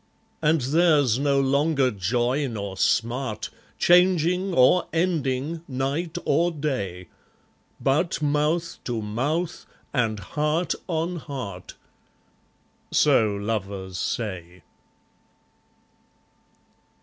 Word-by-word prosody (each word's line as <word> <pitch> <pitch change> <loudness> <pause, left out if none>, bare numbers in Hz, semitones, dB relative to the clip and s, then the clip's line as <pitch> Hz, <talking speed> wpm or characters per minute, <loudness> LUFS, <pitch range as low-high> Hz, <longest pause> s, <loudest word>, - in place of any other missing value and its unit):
And 155 -1 +3
theirs 145 -3 +3
no 140 -1 +2
longer 140 0 +2
joy 120 +8 0
nor 100 -5 -5
smart, 115 +2 0 0.3
Changing 180 +1 +3
or 170 +4 +4
ending, 160 -3 -1
night 140 +6 -2
or 170 +2 +3
day; 105 - -3 0.7
But 150 +6 +1
mouth 150 +3 0
to 115 -3 -2
mouth, 145 +11 -2 0.3
and 115 -5 0
heart 150 - -1
on 170 0 -1
heart, 125 - -7 1.2
So 135 -7 +4
lovers 100 -3 -4
say. 90 -6 -4
140 Hz, 85 wpm, -25 LUFS, 110-160 Hz, 1.2 s, or